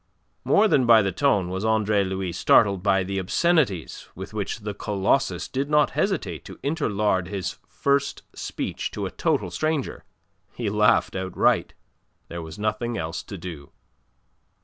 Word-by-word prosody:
More 215 +2 +4
than 130 - +3
by 115 -2 +7
the 95 - 0
tone 100 -4 +1
was 95 +2 -3
Andre 110 -2 +2
Louis 95 -1 -3
startled 95 +2 +4
by 95 -1 +2
the 95 +1 -3
obscenities 120 - 0
with 95 +3 -8
which 105 +1 -3
the 105 0 -4
Colossus 105 +7 0
did 135 +2 -3
not 150 -1 +3
hesitate 150 - -1
to - - -10
interlard 105 - 0
his 95 -2 -4
first 140 0 0
speech - - -4
to - - -2
a - - -4
total 90 - 0
stranger. 155 - -2 0.5
He 115 -4 -2
laughed 105 0 +3
outright. 95 -1 +1 0.5
There 85 0 -5
was 80 -1 -9
nothing 110 +3 -2
else 80 -2 -3
to 100 - -9
do. 80 -5 -9
105 Hz, 150 wpm, -24 LUFS, 95-130 Hz, 0.5 s, by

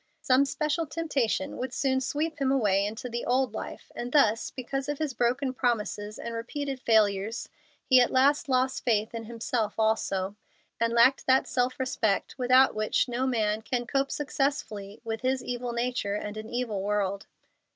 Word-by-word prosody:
Some 260 +2 +4
special 305 +3 -1
temptation 285 -3 -1
would 255 0 -3
soon 265 0 +1
sweep 305 +5 -2
him 265 -1 +2
away 205 -7 +2
into 220 +4 -6
the 235 0 -4
old 255 -2 +1
life, - - -7
and 240 +1 -5
thus, 225 -6 +3
because 270 +2 -4
of 290 - -1
his 305 -3 -2
broken 250 +2 0
promises 215 -4 -1
and 235 - -6
repeated 270 +4 -4
failures, 215 -2 +1 0.4
he 255 -1 +6
at 245 - +3
last 280 +3 +3
lost 260 0 +1
faith 220 -3 +1
in 225 -1 -5
himself 225 -1 -2
also, 205 -3 0 0.4
and 230 0 +1
lacked 235 +3 +4
that 260 0 +4
self 250 +1 0
respect 225 -6 0
without 255 +1 +5
which 215 +4 +1
no 250 +2 -1
man 215 -3 0
can 240 +2 -2
cope 275 +3 0
successfully 270 -8 -2
with 225 -1 -4
his 255 0 0
evil 245 0 -3
nature 235 -4 -1
and 210 0 -4
an 215 +1 -7
evil 240 -5 -2
world. 200 -1 -1
245 Hz, 170 wpm, -28 LUFS, 220-265 Hz, 0.4 s, he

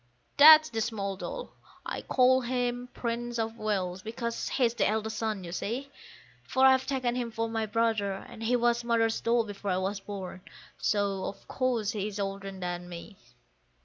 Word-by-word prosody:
That's 310 +1 +9
the 225 -2 -1
small 200 -4 -2
doll. - - -6 0.3
I - - -4
call 260 0 +4
him 245 0 -2
the - - -18
Prince 240 0 -2
of 225 0 -3
Wales 190 -4 -1
because 230 +2 -4
he's 240 -4 +2
the 225 -4 +1
eldest 220 0 -2
son, 215 -4 -2
you 170 - -7
see; 250 +10 -4 0.5
For 265 0 +2
I've 260 0 +5
taken 255 -3 0
him 245 -1 -2
for 225 0 -2
my 225 -1 -2
brother, 220 -2 +1
and 225 +4 -10
he 230 +2 +2
was 240 0 +2
Mother's 230 -1 +1
doll 235 0 +2
before 205 -1 -6
I 180 - +1
was 195 +2 -2
born, 195 -2 -7 0.4
so 200 -2 0
of - - -7
course 245 -5 0
he 205 -1 -2
is 210 -1 -6
older 195 0 -3
than 180 -2 -5
me. 175 +4 -9
225 Hz, 180 wpm, -29 LUFS, 200-240 Hz, 0.5 s, That's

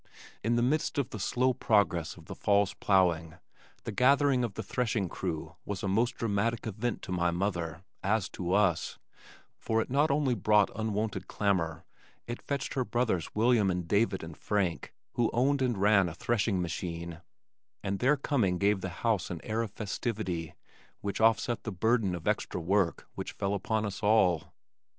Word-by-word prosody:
In 115 +3 +2
the 120 - +2
midst 145 +5 0
of 140 -4 -1
the 105 - -5
slow 125 +6 +1
progress 90 -9 +1
of - - -14
the - - -7
fall's 100 -1 +2
plowing, 85 -5 +2 0.5
the - - -4
gathering 135 0 +4
of 115 -4 -3
the - - -4
threshing 115 -6 -1
crew 80 -1 -4
was 100 +1 -5
a - - 0
most 115 +6 +1
dramatic 115 +1 -1
event 110 +3 -3
to - - -6
my 90 -1 +1
mother, 85 -2 -2 0.2
as 105 0 +1
to 90 -1 -4
us, 95 -5 +2 0.6
for 110 0 0
it 115 - -2
not 145 +4 +3
only 140 -2 +2
brought 105 -1 +3
unwonted 110 -1 -2
clamor, 85 -6 -1 0.4
it 120 +1 -5
fetched 140 -1 -3
her 130 - 0
brothers 110 -7 -1
William 110 -2 +4
and 90 -2 -2
David 100 -1 +1
and 80 -1 -8
Frank, 95 -5 -1 0.2
who 120 -2 +1
owned 135 +4 +2
and 125 -4 +1
ran 100 -2 +4
a 80 - -8
threshing 105 0 0
machine, 85 0 -4 0.6
and 100 -1 -2
their 135 +4 +3
coming 120 -11 +1
gave 100 +1 +2
the 95 - -3 0.2
house 110 -4 +1
an 85 - -4
air 110 +1 -1
of 115 - -3
festivity 100 -5 -3 0.5
which 100 +1 -3
offset 115 +1 +3
the 110 - -5
burden 105 0 +1
of 85 - -7
extra - - 0
work 90 +1 +1
which - - -6
fell 100 +1 -1
upon 110 +2 -1
us 100 -2 -5
all. 100 -7 +3
105 Hz, 175 wpm, -30 LUFS, 90-115 Hz, 0.6 s, gathering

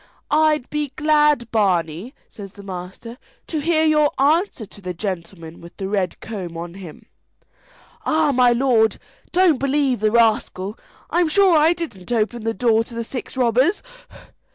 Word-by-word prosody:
"I'd 305 -3 +2
be 300 -2 -2
glad, 300 -5 +2
Barney," 185 - 0
says 200 -2 -11
the 200 - -13
master, 190 +5 -8 0.3
"to 315 - -3
hear 320 +1 +1
your 300 -1 +4
answer 300 - +1
to 205 - -17
the 180 -2 -5
gentleman 170 -3 -6
with 170 0 -14
the 190 - -4
red 195 -3 -2
comb 185 -7 -6
on 170 0 -7
him." 180 -5 -11 1.0
"Ah, 315 -2 +2
my 250 -2 +4
lord, 235 -3 +2 0.3
don't 355 -6 +3
believe 275 -2 +1
the 215 +1 +2
rascal; 215 -3 +1 0.5
sure 380 +1 +4
I 315 +2 +5
didn't 285 - -7
open 225 0 -1
the 225 - 0
door 225 +1 +2
to 235 - -11
the 230 - -3
six 250 +2 -7
robbers." 255 - +2
235 Hz, 155 wpm, -21 LUFS, 195-300 Hz, 1.0 s, I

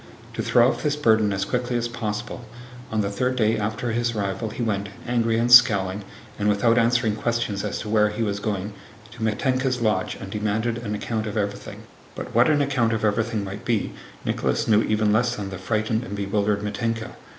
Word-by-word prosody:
To - - -3
throw 120 0 +4
off - - -3
this 150 -1 0
burden 110 -7 +3
as 100 0 -1
quickly 125 +1 -1
as 120 0 -1
possible, 120 0 -4 0.5
on 110 -1 +1
the 100 -1 -2
third 125 +5 0
day 110 -2 +2
after 110 +2 -2
his 120 0 -1
arrival 100 +2 -2
he 120 - -4
went, 100 -3 -1 0.2
angry 115 -2 +1
and 120 +1 +1
scowling 105 -5 +6 0.4
and 105 0 +2
without 115 +4 +3
answering 115 -2 +2
questions 115 -4 -1
as 105 - -2
to 105 - -6
where 105 -1 +3
he 105 +2 -2
was 100 -2 -1
going, 100 -1 -3 0.4
to 115 +1 -12
Mítenka's 130 +4 0
lodge 105 -5 0
and 95 - -9
demanded 110 +3 -1
an 105 -3 -4
account 110 +1 -3
of 105 - -4
everything. 100 -1 -4 0.3
But - - -7
what 120 +4 +5
an 145 -2 +3
account 125 -5 +1
of 110 -1 0
everything 110 0 0
might 100 +1 -7
be 115 -4 -1 0.3
Nicholas - - 0
knew 110 -1 +5
even 105 -1 +1
less 120 +2 +2
than 100 -2 -5
the 95 - -6
frightened 110 +3 -1
and 100 -2 -6
bewildered 100 +1 0
Mítenka. 115 +1 -2
110 Hz, 200 wpm, -24 LUFS, 105-120 Hz, 0.5 s, scowling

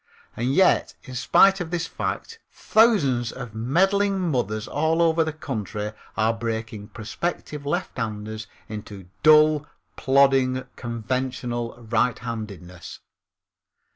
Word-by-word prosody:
And 125 +4 -1
yet, 190 - +3
in 130 - -10
spite 195 +9 +4
of 170 - -4
this 175 -1 -1
fact, 455 0 -4
thousands 140 - +3
of 125 -4 -8
meddling 190 - +2
mothers 110 -5 -1
all 160 +3 0
over 165 -1 +4
the 160 - -2
country 105 - -5 0.2
are 110 +1 +2
breaking 110 -2 -4
prospective 145 +6 -5
lefthanders 110 - -3 0.2
into 100 -3 -8
dull, 155 -1 +5 0.3
plodding, 135 -1 +3
conventional 120 0 -3
righthandedness. 110 -6 -3
125 Hz, 105 wpm, -24 LUFS, 110-155 Hz, 0.3 s, dull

